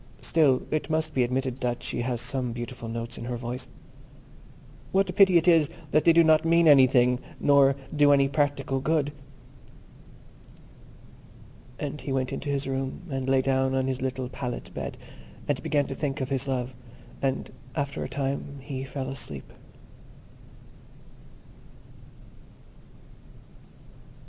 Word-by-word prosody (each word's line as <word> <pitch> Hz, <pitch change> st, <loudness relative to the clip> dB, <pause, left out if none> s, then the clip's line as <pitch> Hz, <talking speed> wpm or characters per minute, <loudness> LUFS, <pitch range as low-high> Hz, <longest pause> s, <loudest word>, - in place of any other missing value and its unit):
Still, 145 Hz, -6 st, +3 dB
it 155 Hz, -1 st, -1 dB
must 155 Hz, 0 st, 0 dB
be 130 Hz, -, +1 dB
admitted 130 Hz, +1 st, -1 dB
that 120 Hz, -1 st, -2 dB
she -, -, -3 dB
has 120 Hz, -1 st, -2 dB
some 130 Hz, -4 st, -2 dB
beautiful 120 Hz, 0 st, -6 dB
notes 115 Hz, +1 st, -5 dB
in 115 Hz, -, -6 dB
her 120 Hz, 0 st, -3 dB
voice. 125 Hz, +2 st, -5 dB, 1.2 s
What 195 Hz, +1 st, +3 dB
a -, -, -10 dB
pity 190 Hz, -3 st, +6 dB
it 170 Hz, -, +1 dB
is 165 Hz, -4 st, +5 dB, 0.2 s
that 155 Hz, -, +3 dB
they 170 Hz, -, +8 dB
do 170 Hz, 0 st, +6 dB
not 155 Hz, 0 st, +5 dB
mean 170 Hz, 0 st, +4 dB
anything, 125 Hz, -3 st, +6 dB, 0.3 s
or 140 Hz, -1 st, +6 dB, 0.2 s
do 145 Hz, -1 st, +5 dB
any 140 Hz, -1 st, +5 dB
practical 140 Hz, -1 st, 0 dB
good." 145 Hz, 0 st, 0 dB, 2.6 s
And 145 Hz, -1 st, -5 dB
he 135 Hz, -, -5 dB
went 130 Hz, -1 st, -1 dB
into 145 Hz, -, -4 dB
his 140 Hz, 0 st, -1 dB
room, 135 Hz, +3 st, -3 dB
and 135 Hz, -1 st, -2 dB
lay 135 Hz, -1 st, +3 dB
down 130 Hz, 0 st, +1 dB
on 130 Hz, -1 st, +1 dB
his 130 Hz, -1 st, -2 dB
little 130 Hz, -1 st, -2 dB
pallet 125 Hz, -1 st, -6 dB
bed, -, -, -5 dB, 0.5 s
and -, -, 0 dB
began 145 Hz, -1 st, +1 dB
to 135 Hz, -, -5 dB
think 135 Hz, 0 st, -3 dB
of 130 Hz, -, -3 dB
his 135 Hz, -1 st, -1 dB
love; 130 Hz, -1 st, -2 dB, 0.5 s
and, 135 Hz, -1 st, -1 dB, 0.2 s
after 140 Hz, -3 st, -2 dB
a -, -, -5 dB
time, 140 Hz, +1 st, -3 dB
he 130 Hz, -1 st, -5 dB
fell 135 Hz, 0 st, -5 dB
asleep. 75 Hz, -, -6 dB
135 Hz, 145 wpm, -27 LUFS, 130-145 Hz, 2.6 s, they